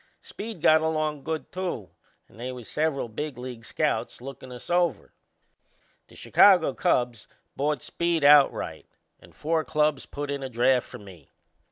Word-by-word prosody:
Speed 210 -6 -8
got 155 0 +6
along 155 -2 -1
good 160 -1 -4
too, 175 - -4 0.4
and 110 - -19
they 125 +2 -4
was 125 -3 -9
several 150 -4 -1
big 135 +4 -5
league 125 -2 -8
scouts - - -2
lookin' 130 0 -10
us 125 - -10
over. 175 - 0 0.9
The - - -18
Chicago 180 -8 +5
Cubs 120 -3 0 0.3
bought 145 -1 -1
Speed 170 -2 -1
outright 145 -1 +4 0.3
and - - -19
four 160 +1 0
clubs 150 -2 0
put 145 0 -5
in 140 -1 -3
a 135 - -5
draft 125 +1 +2
for - - -10
me. 95 -8 -15
145 Hz, 155 wpm, -26 LUFS, 125-160 Hz, 0.9 s, got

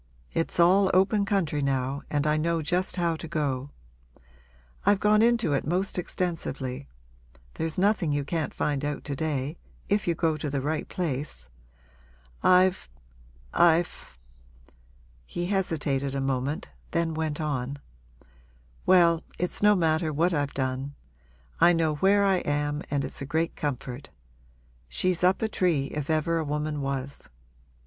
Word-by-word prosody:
It's 165 +1 -2
all 185 +3 +5
open 200 +2 +3
country 180 -8 0
now 135 0 -1
and 145 -1 0
I 150 0 +3
know 165 +1 0
just 180 +4 -1
how 170 -3 +1
to 165 - -7
go. 145 -4 -2 1.1
I've 200 0 +4
gone 210 0 +4
into 230 -8 +3
it 140 - +1
most 180 +4 -1
extensively; 145 -7 -3 0.7
there's 160 -1 -3
nothing 195 -4 +2
you 145 -1 0
can't 160 0 -2
find 145 -1 -1
out 145 -1 -3
to 140 - -3
day 150 0 -2 0.3
if 205 -1 +1
you 170 - +2
go 160 -1 +1
to 150 0 -3
the 140 0 -1
right 150 +3 -2
place. 140 - -3 0.9
I've 185 - +4 0.6
I've 170 - +2 0.5
' 65 - -31 0.5
He 175 - -3
hesitated 145 -8 -1
a - - 0
moment, 135 +2 -2 0.2
then 165 -1 0
went 155 -1 -2
on: 140 -3 -2 1.1
'Well, 170 -3 +5 0.2
it's 180 - -2
no 210 0 +6
matter 160 -2 +1
what 170 +4 +1
I've 145 -2 -1
done. 130 +1 -2 0.6
I 175 +1 +6
know 165 -2 +1
where 200 +3 +4
I 195 -1 +3
am 145 -2 -1
and 140 -1 0
it's - - -8
a - - -3
great 160 +3 -1
comfort. 135 -1 -4 0.8
She's 180 - 0
up 185 +4 +3
a - - +2
tree, 170 -10 0
if 150 -1 -4
ever 160 +1 +1
a - - -1
woman 150 0 -2
was. 135 0 -4
155 Hz, 150 wpm, -27 LUFS, 140-180 Hz, 1.1 s, no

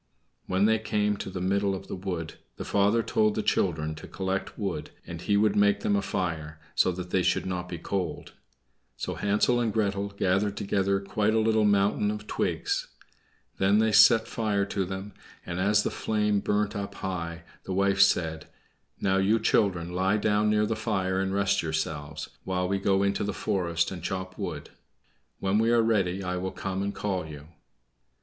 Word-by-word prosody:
When 95 +2 +2
they 110 0 +3
came 105 -1 0
to - - -5
the 95 - -5
middle 100 +1 +1
of 95 - -8
the - - -5
wood 90 -4 -4 0.2
the - - -5
father 105 +3 +2
told 110 -1 +1
the 110 - -1
children 80 -6 0
to 80 - -10
collect 95 0 -3
wood, 95 -8 -3 0.2
and 85 -1 -7
he 100 +2 +2
would 105 0 +3
make 100 0 +3
them 100 - +1
a 100 - +2
fire, 80 -5 -3
so 95 - +3
that 90 0 -7
they 95 - +2
should 90 0 +1
not 90 -1 -3
be 85 - -4
cold. 90 -1 -4 0.7
So - - -3
Hansel 105 +4 +2
and 115 -2 +1
Gretel 100 -2 0
gathered 100 +1 0
together 100 -1 +1
quite 105 +2 0
a - - +4
little 110 -1 +3
mountain 100 0 +2
of 105 0 -4
twigs. - - -1 0.7
Then 95 +2 +4
they 110 0 +3
set 110 +1 +6
fire 105 -3 0
to 100 -1 -2
them; 95 +2 -6 0.3
and 85 - -4
as 105 +2 +3
the - - -1
flame 105 -1 0
burnt 105 +2 0
up 100 -1 -4
high, 85 -3 -4 0.2
the - - -5
wife 100 +1 +2
said, 80 -5 +2 0.5
"Now, 95 0 +2
you 100 +4 +3
children, 95 -6 +1
lie 95 +3 +2
down 105 0 +2
near 105 0 +3
the 110 - -1
fire, 95 -4 -1
and 95 0 -1
rest 100 0 +1
yourselves, 80 -1 -3 0.2
while 90 -1 -1
we 100 +1 0
go 95 0 +2
into 100 0 0
the 105 -1 -3
forest 85 -3 0
and 90 -2 -6
chop 95 +2 -4
wood. 85 -8 -5 0.7
When 95 +2 +1
we 115 +1 +3
are 120 -1 +4
ready 100 -4 +1
I 90 0 -2
will 95 +1 -3
come 95 0 -4
and 100 0 -1
call 95 -5 -3
you." 75 0 -10
100 Hz, 190 wpm, -27 LUFS, 90-105 Hz, 0.7 s, set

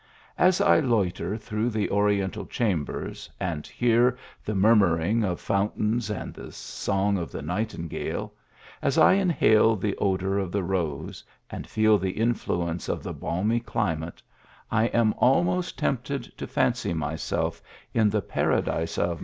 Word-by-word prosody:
As 185 0 +4
I - - +5
loiter 105 - 0
through 110 +1 -2
the 110 -3 -1
oriental 100 -2 +1
chambers, 95 -11 -2
and 80 -5 -3
hear 120 +1 +2 0.3
the 105 - -3
murmuring 100 0 +3
of 90 -4 -1
fountains 105 +3 0
and 105 -4 -4
the - - -10
song 100 0 -1
of 85 - -5
the - - -6
nightingale: 90 0 -3 0.5
as - - 0
1 - - +7
in 195 -2 +2
hale 110 -8 +4
the 100 0 -2
odour 95 0 0
of 95 -3 -3
the 100 0 -1
rose 85 -6 -3 0.3
and - - -6
feel 110 -1 +3
the 95 0 -3
influence 90 -7 -1
of - - -2
the - - -5
balmy 105 +7 0
climate, 85 -8 -3 0.5
I 115 0 +3
am 115 -2 +2
almost 175 +7 +2
tempted 135 +1 -1
to - - -6
fancy 85 - 0
myself 80 0 -2 0.3
in 110 -2 +3
the 105 -1 0
Paradise 80 0 0
of 85 -1 0
105 Hz, 145 wpm, -26 LUFS, 90-115 Hz, 0.5 s, 1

